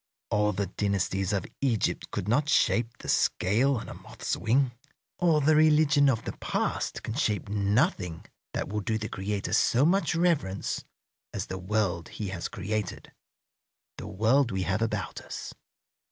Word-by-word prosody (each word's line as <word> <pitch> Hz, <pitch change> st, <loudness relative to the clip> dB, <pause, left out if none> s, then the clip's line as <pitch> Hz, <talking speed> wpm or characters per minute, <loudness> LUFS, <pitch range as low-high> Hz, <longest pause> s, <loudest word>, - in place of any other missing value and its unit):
All 105 Hz, 0 st, +3 dB
the 100 Hz, 0 st, -1 dB
dynasties 95 Hz, 0 st, -1 dB
of 100 Hz, -1 st, -1 dB, 0.2 s
Egypt 120 Hz, -6 st, 0 dB
could 90 Hz, -, -4 dB
not 145 Hz, +7 st, +2 dB
shape 115 Hz, -5 st, +2 dB
the -, -, -10 dB
scale 120 Hz, +9 st, +2 dB
on -, -, -6 dB
a -, -, -7 dB
moth's -, -, -4 dB
wing. 125 Hz, +3 st, +2 dB, 0.5 s
All 165 Hz, -4 st, +4 dB
the 155 Hz, +2 st, +4 dB
religion 150 Hz, -2 st, +5 dB
of 115 Hz, -4 st, 0 dB
the -, -, -2 dB
past -, -, -2 dB
can 110 Hz, -, -4 dB
shape 110 Hz, -6 st, 0 dB
nothing 100 Hz, -, 0 dB, 0.3 s
that -, -, -1 dB
will 105 Hz, +1 st, -2 dB
do 110 Hz, +3 st, -1 dB
the 110 Hz, 0 st, -4 dB
Creator 100 Hz, +1 st, -3 dB
so 125 Hz, +4 st, +4 dB
much 185 Hz, +1 st, +2 dB
reverence 160 Hz, -, 0 dB, 0.5 s
as -, -, -2 dB
the 95 Hz, -, -5 dB
world 90 Hz, -3 st, -1 dB
He 105 Hz, -3 st, -5 dB
has 95 Hz, -2 st, -4 dB
created, 105 Hz, +2 st, -4 dB, 0.9 s
the -, -, -6 dB
world 115 Hz, +7 st, +2 dB
we 95 Hz, -4 st, -1 dB
have 95 Hz, +3 st, -1 dB
about 110 Hz, -2 st, -2 dB
us. -, -, -7 dB
110 Hz, 160 wpm, -28 LUFS, 100-140 Hz, 0.9 s, religion